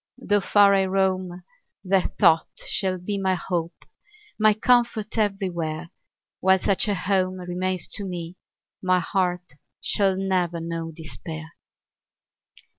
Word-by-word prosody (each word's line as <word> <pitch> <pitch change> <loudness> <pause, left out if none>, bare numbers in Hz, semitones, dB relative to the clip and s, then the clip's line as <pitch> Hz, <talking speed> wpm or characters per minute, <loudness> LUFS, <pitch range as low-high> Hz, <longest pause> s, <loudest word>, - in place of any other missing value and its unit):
Though 205 -5 +1
far 200 0 +5
I 195 -1 +3
roam, 185 -2 -1 0.4
that 190 -1 0
thought 165 -5 +5 0.2
shall 190 -2 0
be 200 +3 -3
My 190 -1 +1
hope, 170 -1 -4 0.5
my 215 -1 +5
comfort, 235 -2 +2
everywhere; 175 -6 -2 0.5
While 190 0 +4
such 195 +2 +1
a 205 - +1
home 185 0 0
remains 180 0 -2
to 205 - -1
me, 175 -2 -5 0.5
My 185 -1 +3
heart 180 -3 -2 0.2
shall 195 -2 +1
never 180 -3 0
know 165 0 -4
despair! 160 0 -8
185 Hz, 120 wpm, -24 LUFS, 175-195 Hz, 0.5 s, far